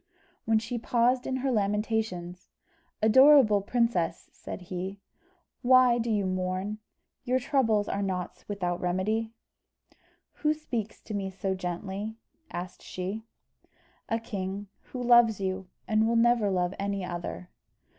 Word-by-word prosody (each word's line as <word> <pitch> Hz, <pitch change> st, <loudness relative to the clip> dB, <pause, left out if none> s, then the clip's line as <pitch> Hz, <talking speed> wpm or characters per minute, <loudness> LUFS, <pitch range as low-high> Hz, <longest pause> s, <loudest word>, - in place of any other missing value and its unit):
When 225 Hz, -1 st, +3 dB
she 235 Hz, +2 st, -3 dB
paused 245 Hz, +2 st, +2 dB
in 260 Hz, -, -1 dB
her 265 Hz, -, +2 dB
lamentations, 210 Hz, -4 st, -1 dB, 0.5 s
"Adorable 255 Hz, -2 st, +7 dB
princess," 230 Hz, -5 st, 0 dB
said -, -, -8 dB
he, 185 Hz, +2 st, -5 dB, 0.6 s
"why 250 Hz, -1 st, +6 dB
do 235 Hz, 0 st, -1 dB
you 205 Hz, -3 st, +1 dB
mourn? 185 Hz, +3 st, -2 dB, 0.4 s
Your 255 Hz, 0 st, +1 dB
troubles 240 Hz, -6 st, +2 dB
are 200 Hz, -, -1 dB
not 185 Hz, -2 st, -3 dB
without 180 Hz, -4 st, -2 dB
remedy." 210 Hz, +5 st, 0 dB, 1.1 s
"Who 305 Hz, 0 st, +3 dB
speaks 235 Hz, -8 st, -4 dB
to 215 Hz, -, -8 dB
me 195 Hz, -1 st, -2 dB
so 190 Hz, 0 st, -2 dB
gently?" 190 Hz, +4 st, -4 dB, 0.3 s
asked 180 Hz, +1 st, -6 dB
she. 195 Hz, +5 st, -5 dB, 0.8 s
"A 225 Hz, -, +1 dB
king, 200 Hz, -3 st, -5 dB, 0.2 s
who 250 Hz, -1 st, -6 dB
loves 235 Hz, -3 st, +6 dB
you, 190 Hz, -1 st, -3 dB, 0.2 s
and 220 Hz, 0 st, +3 dB
will 230 Hz, -, +1 dB
never 230 Hz, -2 st, +4 dB
love 180 Hz, -1 st, 0 dB
any 200 Hz, -1 st, -2 dB
other." 175 Hz, 0 st, -5 dB
210 Hz, 130 wpm, -28 LUFS, 185-235 Hz, 1.1 s, Adorable